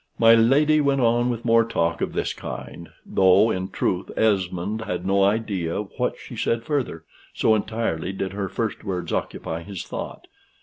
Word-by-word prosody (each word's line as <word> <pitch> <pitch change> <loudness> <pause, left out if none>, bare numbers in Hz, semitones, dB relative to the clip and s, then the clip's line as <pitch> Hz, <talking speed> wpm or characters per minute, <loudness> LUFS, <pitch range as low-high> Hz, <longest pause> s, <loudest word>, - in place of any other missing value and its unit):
My 115 0 +7
lady 145 +7 +4
went 140 -1 +2
on 120 0 +3
with 120 -1 -3
more 115 0 +5
talk 85 -7 -1
of - - -2
this - - -1
kind, - - -8 0.2
though, 95 +4 +4
in 95 -1 -3
truth, 95 -1 -1
Esmond 100 0 0
had 90 -4 -4
no 100 +1 +3
idea 100 -5 0
of 105 -1 -5
what - - -1
she - - -10
said 115 0 0
further, 125 - -2 0.3
so 110 - +3
entirely 110 -5 -1
did 95 0 -4
her 100 -1 -3
first 115 -3 -3
words 90 -5 -3
occupy 80 +1 -3
his 95 0 -7
thought. - - -7
105 Hz, 175 wpm, -24 LUFS, 95-115 Hz, 0.3 s, My